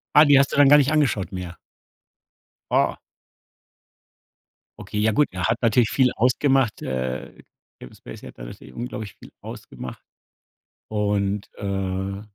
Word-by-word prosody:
Ah, 150 - +9
die 145 -2 +6
hast 140 - +2
du - - -2
dann 145 -1 +7
gar 145 - +8
nicht 140 -1 +3
angeschaut 140 -12 +1
mehr. 90 -1 -7 1.1
Oh. - - +2 1.8
Okay, 105 - -5
ja 110 - +3
gut, 145 +7 +3
er 90 0 -5
hat 115 - +1
natürlich 115 0 +3
viel 130 -2 +2
ausgemacht 130 -1 +2
äh, 65 0 -4 0.4
Kevin 60 - -12
Spacey - - -11
hat - - -13
da - - -9
natürlich 65 +1 -12
unglaublich 110 -5 -6
viel - - -15
ausgemacht 65 - -9 0.9
und, 100 -1 -1
äh 95 0 -3
105 Hz, 140 wpm, -23 LUFS, 95-135 Hz, 1.8 s, Ah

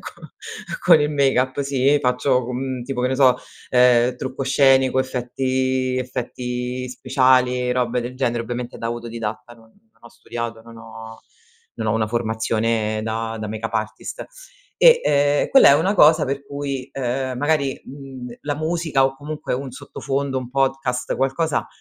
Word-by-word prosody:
co - - -11 0.6
con 165 -3 +7
il 150 0 +1
make 140 -3 +2
up 130 +2 0
sì 140 +1 +2
faccio, 125 0 +1
mhmm, 130 0 -3
tipo, 125 0 -4
che 125 - +1
ne 130 - 0
so, 130 -2 +5 0.3
ehm, 125 0 +4
trucco 130 +2 -5
scenico, 135 -1 +3
effetti 130 0 -1
effetti 125 0 -4
speciali, 125 0 +2
robe 125 -1 0
del 120 +2 -6
genere, 120 -3 -1
ovviamente 120 +1 -5
da 115 - -4
auto 120 0 -4
didatta, 115 +1 -6
non 115 -1 -21 0.2
non - - -36
ho - - -11
studiato, 115 -1 -6
non 115 0 -14
ho 115 0 -11 0.6
non 110 -1 -2
ho - - +2
una 110 -1 +1
formazione 110 -1 -1
da 115 0 -3
da 105 - -4
make 110 +1 -4
up 115 - -11
artist 110 -1 -4 0.5
e, 485 -1 +6
ehm, 145 0 +2
quella 270 - +7
è - - +7
una 185 +8 +1
cosa 155 -3 +6
per 140 +1 -4
cui, 140 -2 -5
ehm, 130 0 -2
magari, 145 -2 0
mhmm, 135 -2 -9
la 145 0 -2
musica 160 -3 0
o 135 0 -1
comunque 150 0 -4
un 130 +1 -5
sottofondo, 135 -1 -3
un 125 -1 -7
podcast, 135 -2 -1
qualcosa 135 +4 0
130 Hz, 165 wpm, -21 LUFS, 120-135 Hz, 0.6 s, con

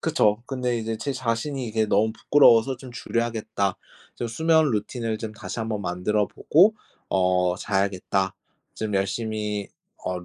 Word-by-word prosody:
그쵸. 115 -9 +2
근데 125 -3 -1
이제 115 0 -3
제 140 +5 -3
자신이 130 +2 -2
이게 110 -1 0
너무 105 +2 +2
부끄러워서 130 0 +5
'좀 130 0 -11
줄여야겠다. 115 -5 -2 0.4
좀 120 - -3
수면 160 +4 +3
루틴을 110 +1 -2
좀 110 -1 -5
다시 110 - -7
한번 110 -2 -2
만들어 95 +4 0
보고 190 - +4 0.3
어 90 -1 +2
자야겠다. 95 -1 0 0.4
좀 110 -2 -3
열심히 105 +1 -2 0.4
어 90 0 -2
루 90 - -11
110 Hz, 305 characters per minute, -25 LUFS, 100-120 Hz, 0.4 s, 부끄러워서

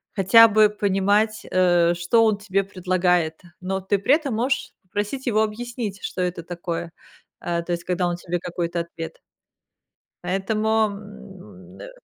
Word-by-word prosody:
хотя 230 +3 +7
бы 215 0 +4
понимать, 205 +1 +1
э, 175 -2 +3
что 175 +7 +2
он 215 -2 +2
тебе 195 -1 -1
предлагает, 180 -4 0 0.2
но 190 +1 -2
ты 195 +2 0
при 265 +8 +4
этом 290 -6 -3
можешь 255 +3 -1
попросить 205 +8 -4
его 215 -2 +2
объяснить, 220 -2 -5
что 185 - -4
это 175 -2 -2
такое. 170 -1 -5 0.5
А, 170 -1 -2
то 175 - -6
есть, 170 0 -2
когда 180 0 0
он 175 - -2
тебе 175 0 -3
какой-то 170 -1 -3
ответ 165 -1 -8 1.0
Поэтому, 215 +4 +1
м, 195 -2 -12
э - - -8
190 Hz, 150 wpm, -23 LUFS, 175-215 Hz, 1.0 s, хотя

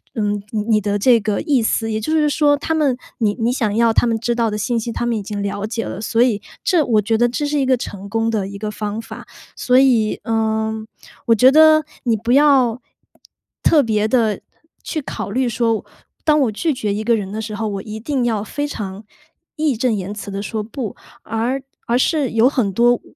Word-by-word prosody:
嗯， 205 -2 -1 0.3
你 215 -1 +3
的 205 0 -1
这 245 +3 +5
个 205 0 -1
意 275 -5 +2
思。 225 0 0
也 215 - -1
就 265 - -3
是 305 -2 +3
说 290 0 +3
他 305 +3 -2
们 285 -5 +1 0.2
你 215 -3 +2
你 230 +1 +1
想 220 -6 -1
要 230 +1 +3
他 - - +3
们 225 -1 0
知 235 +1 -1
道 230 -2 +1
的 210 - -2
信 235 +3 -1
息， 230 +1 -3
他 240 - -3
们 240 -1 0
已 210 - -4
经 205 0 -5
了 200 0 -3
解 225 +1 -3
了， 190 - -6
所 225 +1 +1
以 230 -5 +2 0.2
这， 350 -5 +3
我 220 -4 +3
觉 220 +2 0
得 240 +2 +3
这 290 +5 -2
是 295 0 0
一 270 - +1
个 260 -1 +3
成 200 -4 -7
功 225 +1 0
的 210 -4 -1
一 200 0 -8
个 210 +1 -4
方 210 +1 -4
法。 - - -10 0.3
所 250 0 +2
以， 245 -5 +3
呃， 220 -1 0 0.5
我 230 - +5
觉 255 +4 +6
得 310 0 +6 0.2
你 235 -3 +2
不 230 +3 -2
要 265 -4 +4 0.8
特 310 - +5
别 215 -2 +1
地 220 -4 +1 0.4
去 310 - -3
考 265 - -5
虑 255 +3 0
说， 230 -1 0 0.4
当 305 -1 +3
我 250 -5 +2
拒 310 +9 -1
绝 215 -5 -2
一 210 +2 -3
个 235 +1 +3
人 200 -3 -4
的 215 +1 -4
时 215 -1 -5
候， 220 +1 -2
我 200 -2 -4
一 215 +1 -7
定 260 +1 -1
要 220 -4 0
非 290 +7 -3
常 205 -6 -6 0.5
义 305 -4 0
正 245 0 +1
言 200 -1 -4
辞 205 -1 -7
地 195 0 -4
说 215 +1 -3
不， 225 0 -6 0.3
而 230 +5 -2 0.3
而 235 - +2
是 285 -1 +1
有 225 +2 +4
很 250 -7 0
多， 240 +4 +3
225 Hz, 240 characters per minute, -19 LUFS, 210-255 Hz, 0.8 s, 觉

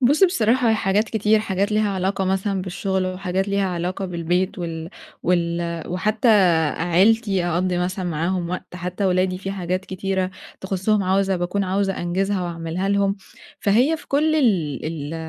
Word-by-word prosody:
بُص 285 +9 +5
بصراحة 240 - +2
هي - - +4
حاجات 205 +1 +1
كتير، 220 0 +2
حاجات 200 -1 -1
ليها 210 -1 +2
علاقة 190 0 -1
مثلًا 190 0 0
بالشغل، 190 0 -2
وحاجات 185 +1 -2
ليها 200 0 +1
علاقة 180 +2 -3
بالبيت 180 +3 -1
وال 165 0 -5 0.3
وال 170 -1 0
وحتى 215 +6 0 0.5
عيلتي، 190 +3 +2
أقضّي 175 +1 0
مثلًا 185 +1 -2
معاهم 170 +2 -1
وقت، 180 0 -6
حتى 180 +3 -3
ولادي 185 0 +1
في 195 +1 -5
حاجات 185 0 -2
كتيرة 190 0 -2 0.3
تخصُّهم، 195 +2 0
عاوزة 190 0 +1
باكون 180 +3 -1
عاوزة 195 +1 0
أنجِزها 190 +2 0
وأعملها 170 +2 -3
لهم. 200 0 +1 0.4
فهي 245 +11 +3
في - - -15
كل 310 +3 +2
ال 180 - +1
ال 155 -1 -5
190 Hz, 155 wpm, -22 LUFS, 180-200 Hz, 0.5 s, بُص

